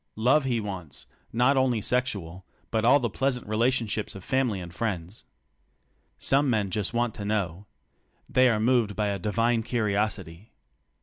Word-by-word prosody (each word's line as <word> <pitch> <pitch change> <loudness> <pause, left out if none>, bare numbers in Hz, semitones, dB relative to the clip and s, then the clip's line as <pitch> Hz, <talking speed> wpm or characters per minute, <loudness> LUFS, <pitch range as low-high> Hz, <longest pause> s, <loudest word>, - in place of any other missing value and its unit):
Love 130 +6 +3
he 120 -3 0
wants 95 -7 -7
— - - -38
not 125 +4 +3
only 130 -3 +2
sexual, 100 -7 -2 0.3
but 110 -1 0
all 130 +5 +6
the 120 - 0
pleasant 125 +3 -1
relationships 110 -1 0
of 95 - -9
fam 130 +3 +1
ily 100 -3 -3
and 85 -1 -8
friends. 95 -2 -4 0.9
Some 140 +1 +2
men 105 -5 0
just 105 0 0
want 120 -1 0
to 105 - -7
know. 100 -2 -2 0.6
They 130 0 +4
are 110 -3 +1
moved 115 -3 +2
by 105 -1 0
a 100 -1 -2
divine 115 +4 +1
curiosity. 105 -5 -2
110 Hz, 165 wpm, -27 LUFS, 100-125 Hz, 0.9 s, all